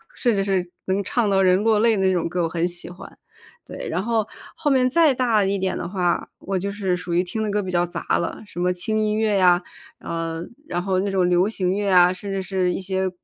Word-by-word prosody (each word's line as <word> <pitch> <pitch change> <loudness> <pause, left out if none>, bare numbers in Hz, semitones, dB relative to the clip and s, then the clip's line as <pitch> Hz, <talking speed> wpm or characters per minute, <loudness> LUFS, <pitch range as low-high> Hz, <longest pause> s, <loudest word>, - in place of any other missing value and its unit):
甚 240 -4 +1
至 195 - +1
是 190 -3 -1 0.2
能 190 +2 0
唱 220 +1 0
到 195 -1 +3
人 185 +1 +3
落 220 -1 +3
泪 230 0 +4
的 195 - 0
那 190 - +3
种 175 -3 0
歌 175 +1 -1
我 165 - 0
很 170 +1 0
喜 175 -1 -5
欢。 175 +1 -12 0.5
对， - - -7
然 185 - -1
后， 225 -1 0 0.3
后 295 - -1
面 255 -1 +3
再 310 +1 +4
大 235 -5 +2
一 195 +1 0
点 190 -1 -1
的 170 - -4
话， 180 -2 -1
我 195 -1 -3
就 200 +2 -3
是 195 -3 -1
属 180 -1 -5
于 175 +2 +3
听 220 +5 -4
的 210 - -1
歌 210 0 0
比 185 - -5
较 175 0 +2
杂 175 - -2
了， - - -4
什 190 - -9
么 180 +1 +1
轻 215 +5 -1
音 215 0 0
乐 215 -2 +2
呀， 180 -1 +4 0.4
呃， 165 0 -4 0.2
然 175 0 -2
后 190 -1 0
那 200 - -1
种 185 -2 +2
流 180 +2 +3
行 185 -4 -1
乐 205 0 -1
啊， 180 0 +6
甚 195 +2 -7
至 195 -1 -2
是 185 -2 0
一 - - -4
些， 190 0 -1
190 Hz, 270 characters per minute, -22 LUFS, 180-210 Hz, 0.5 s, 啊